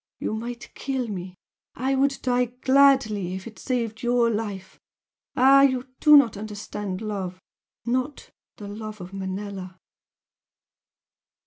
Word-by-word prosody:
You - - -2
might 235 +2 -6
kill 265 -3 -3
me 185 -2 -6 0.4
I 265 +3 0
would 275 +1 +2
die 250 -1 +2
gladly 250 -6 +3
if 190 - -7
it 220 - -10
saved 230 -4 -2
YOUR 240 -1 +2
life! 200 -3 -5 0.6
ah, 270 +2 +7
you 260 -1 +2
do 300 -1 +8
not 260 -7 +4
understand 205 -2 -5
love 190 -4 -4 0.5
not 255 +4 -2 0.3
the 205 - -8
love 215 +1 -7
of 180 +1 -9
Manella!" 190 -1 -5
225 Hz, 125 wpm, -25 LUFS, 200-255 Hz, 0.6 s, do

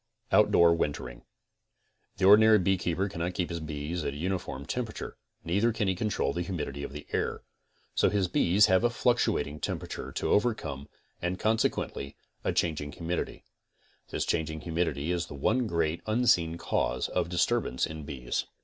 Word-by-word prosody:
OUTDOOR 85 -5 +6
WINTERING 65 -7 -3 1.0
The 95 - +1
ordinary 110 +2 +8
beekeeper 95 -1 +1
cannot 90 -2 -3
keep 90 - -1
his 85 - -3
bees 80 +2 -4
at 70 - -3
a - - -6
uniform 85 -5 -3
temperature; 115 - -4 0.3
neither 100 +8 +2
can 110 -2 -1
he 95 - +2
control 95 -6 -1
the 85 - -2
humidity 85 -6 -4
of 70 - -5
the 75 +1 -8
air. - - -1 0.5
So - - +3
his 100 -3 +1
bees 90 +4 +4
have 95 +1 +3
a 120 - +4
fluctuating 110 -11 +1
temperature - - -4
to - - -1
overcome 80 - 0 0.3
and 90 +1 -1
con 110 +4 +2
sequently 70 -9 -2 0.3
a - - +1
changing 75 -3 -1
humidity. 85 +1 -4 0.7
This'changing 80 -1 -1
humidity 80 -2 -1
is 85 -1 -1
the - - -8
cne 110 - +1
great 85 -3 0
unseen 100 -8 +3
cause 65 -6 -1
of - - -1
disturbance 90 - +1
in 80 -1 -7
bees. 65 -4 -3
85 Hz, 160 wpm, -29 LUFS, 75-100 Hz, 1.0 s, ordinary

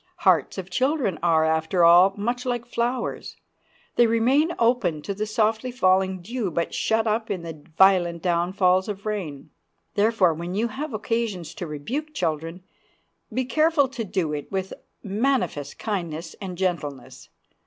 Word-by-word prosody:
Hearts - - +2
of 190 -1 -6
children 255 - 0
are, 165 -2 +3
after 160 +2 +1
all, 175 +3 +7
much 240 +4 -2
like 245 -2 -2
flowers; 240 +1 -3 0.6
they 240 - +6
remain 255 +8 +3
open 230 -10 +1
to 200 - -3
the 210 +2 -3
softly 220 +2 0
falling 190 -6 +1
dew, 230 0 -3
but 170 0 -2
shut 220 0 +1
up 220 +1 0
in 185 -4 -3
the 160 -3 -8
violent 180 -3 +4
downfalls 180 +1 +2
of 200 0 -6
rain. 165 -9 -4 0.4
Therefore, 205 -5 +3
when 170 +3 -5
you 230 +3 0
have 285 +7 -5
occasion 215 -3 -2
to 175 +2 -7
rebuke 260 - -5
children, 165 +1 -2 0.7
be 260 0 -1
careful 310 +1 +3
to 235 - -4
do 185 -6 -2
it 145 -1 -5
with 190 -1 -3 0.3
manifest 210 - -1
kindness 170 -6 -4
and 185 -3 -6
gentleness. 150 -8 -4
195 Hz, 150 wpm, -24 LUFS, 170-230 Hz, 0.7 s, all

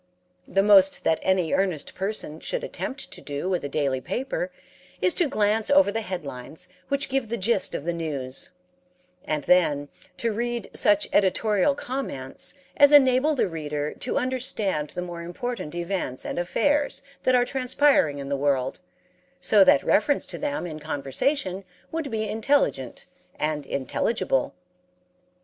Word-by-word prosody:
The 195 - +2
most 195 -2 +5
that 160 - +2
any 185 -4 +1
earnest 185 -5 0
person 190 -6 -4
should - - -3
attempt 270 - -5
to - - -9
do 145 +4 -4
with 180 -4 -1
a 140 - -3
daily 135 -3 0
paper 275 - -3 0.5
is 360 - +3
to 345 - +2
glance 215 -2 +1
over 285 -6 +5
the 225 - -2
headlines 160 - -6 0.2
which 280 0 0
give 270 -3 -1
the 235 - -2
gist 205 -1 +1
of - - -5
the 170 - 0
news, 140 -6 -4 0.8
and 150 -2 -1
then 145 -5 +3 0.3
to 230 - 0
read 235 0 -3
such 205 0 +3
editorial 205 +5 +3
comments 250 - -4 0.2
as 285 0 +7
enable 280 +1 +5
the 250 - +1
reader 150 -3 -4
to 250 - -3
understand 220 - 0
the 180 - -4
more 175 -1 -7
important 180 -1 -5
events 175 -7 -3
and - - -3
affairs 285 +12 0 0.2
that 255 - +3
are 245 0 +4
transpiring 255 - +2
in 140 -1 -6
the 140 - 0
world 135 -2 0 0.6
so 205 +2 +5
that 140 - +5
reference 275 +7 +2
to - - -6
them 290 -6 -2
in 155 -3 -6
conversation 180 - -1 0.3
would 320 -3 -3
be 220 -2 -2
intelligent 215 - 0 0.3
and 150 -2 -2
intelligible. 135 - -1
190 Hz, 150 wpm, -25 LUFS, 150-250 Hz, 0.8 s, as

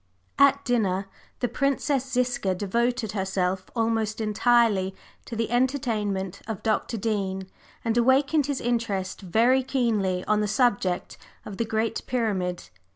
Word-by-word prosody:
At 280 0 +5
dinner, 200 -6 +1 0.4
the 245 - +2
Princess 275 +1 0
Ziska 245 -7 0
devoted 230 +3 0
herself 190 -2 -1
almost 225 -2 0
entirely 215 -3 +2 0.3
to 235 - -6
the 225 0 -2
entertainment 215 -7 0
of 220 -4 -5
Dr. 225 +1 0
Dean, 195 -3 -2 0.4
and 225 0 +1
awakened 270 +4 +3
his 285 -2 -2
interest 230 -6 -1
very 230 +8 +3
keenly 225 -9 0
on 215 0 +2
the 210 - 0
subject 200 -5 0 0.3
of 200 - -7
the 230 - 0
Great 220 0 -1
Pyramid. 190 - -1
225 Hz, 130 wpm, -26 LUFS, 195-245 Hz, 0.4 s, At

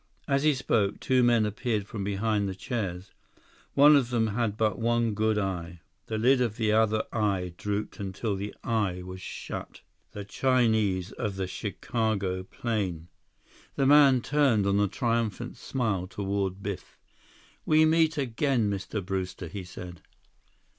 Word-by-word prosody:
As 140 -2 +2
he 150 -1 +3
spoke, 110 -6 0
two 130 -1 +2
men 120 -3 +4
appeared 105 -1 -2
from 105 -1 -5
behind 100 +1 0
the 95 - -5
chairs. 95 -2 -4 0.6
One 145 +2 +8
of 130 -4 +2
them 115 -2 +1
had 110 -2 -1
but 110 0 +1
one 115 -1 +1
good 110 +1 +1
eye. 90 -4 -3 0.3
The 110 - -2
lid 125 +4 +4
of 115 -3 -1
the 110 -2 +1
other 110 0 +3
eye 100 -5 0
drooped 105 +2 -3
until 100 +2 -3
the 100 +2 -5
eye 100 -6 -1
was 95 0 -8
shut. - - -7 0.3
The 100 -1 -6
Chinese 110 -6 +1
of 105 -5 -4
the 95 -1 -2
Chicago 100 -1 -2
plane! 95 -5 -3 0.7
The 135 - +1
man 140 -2 +6
turned 135 -8 +2
on 100 0 +2
a 105 - +3
triumphant 115 +1 -1
smile 110 -8 -2
toward 100 -1 -3
Biff. 100 -2 -6 0.7
"We 155 0 +4
meet 160 0 +3
again, 125 -4 +1
Mr. 100 0 -4
Brewster," 95 -1 -3
he 95 +4 -6
said. 90 -1 -9
105 Hz, 150 wpm, -28 LUFS, 95-120 Hz, 0.7 s, One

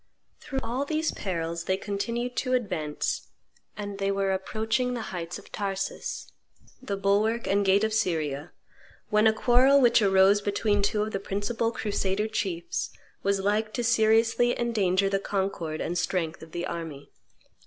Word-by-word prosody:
Through 270 -2 -4
all 240 +4 -1
these 310 +2 0
perils 170 -3 -3
they 190 - +1
continued 235 +5 -3
to 255 -2 0
advance, 175 -11 -2 0.5
and 205 -1 -5
they 195 0 0
were 195 -1 +1
approaching 220 +6 -1
the 230 -4 -5
heights 170 -1 -4
of - - -15
Taurus, 195 -1 -4 0.5
the 200 -6 -3
bulwark 210 +4 +1
and 200 +1 +2
gate 195 +1 +4
of 220 0 +1
Syria, 155 -9 -1 0.6
when 210 +1 +5
a - - +6
quarrel 255 +5 +5
which 240 -3 +5
arose 195 0 +5
between 205 0 +1
two 210 +1 +1
of 215 - -4
the 195 - -2
principal 205 +4 -1
crusader 205 -1 -1
chiefs 185 -6 -2 0.3
was 200 0 +1
like 215 +2 0
to 240 - -1
seriously 225 +1 +3
endanger 200 -5 +2
the 195 0 +1
concord 190 -6 -2
and 175 - -2
strength 175 -3 -1
of 160 - -11
the 175 +2 -3
army. 160 -6 -6
200 Hz, 155 wpm, -27 LUFS, 190-225 Hz, 0.6 s, a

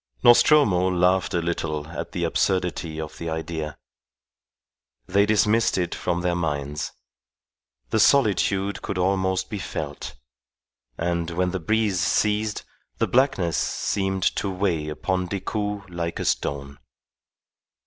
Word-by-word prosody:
Nostromo 120 - +5
laughed 90 0 +2
a 85 - 0
little 80 -3 -2
at 85 - -6
the - - -3
absurdity 90 -4 0
of 80 -1 -7
the 85 - -4
idea. 80 -1 -4 1.3
They 100 +6 +2
dismissed 110 +1 +3
it 90 -2 -1
from 90 0 -2
their 90 0 0
minds. 75 -4 -2 1.0
The - - +2
solitude 100 -5 +3
could 100 - -4
almost 95 0 +1
be 105 - -3
felt. 75 -7 -5 0.8
And 85 0 -1
when 90 +1 0
the 95 - -2
breeze 105 +2 +1
ceased, 105 +3 +1 0.3
the - - +2
blackness 120 -10 +2
seemed 95 -1 -1
to 100 - -1
weigh 90 -5 -1
upon 90 +4 -2
Decoud 105 +1 -3
like 85 -1 -3
a - - -3
stone. 70 0 -2
90 Hz, 125 wpm, -24 LUFS, 85-100 Hz, 1.3 s, Nostromo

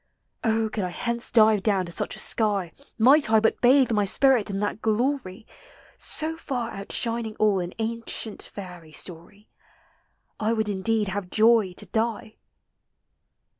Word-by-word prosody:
Oh, 225 -1 +1
could 215 -2 -3
I 180 - -2
hence 235 +6 -3
dive 220 -3 +4
down 195 -3 +1
to 170 - -9
such - - -3
a - - -7
sky, 200 -6 0 0.3
Might 265 +3 +5
I 220 0 +5
but 225 +1 0
bathe 255 0 +5
my 210 -2 +2
spirit 245 +2 +3
in 195 0 -3
that 205 +1 -3
glory, 225 -2 -1 0.5
So 320 +1 -3
far 250 -7 -4
outshining 225 +2 -3
all 210 -3 +2
in 175 0 -5
ancient 225 -1 -3
fairy 180 -5 -9
story, 185 +6 -11 0.9
I 220 +1 +1
would 220 -2 0
indeed 205 +1 +1
have 190 -1 -4
joy 220 -3 +3
to 210 - -5
die 220 +2 -3
220 Hz, 150 wpm, -25 LUFS, 195-230 Hz, 0.9 s, Might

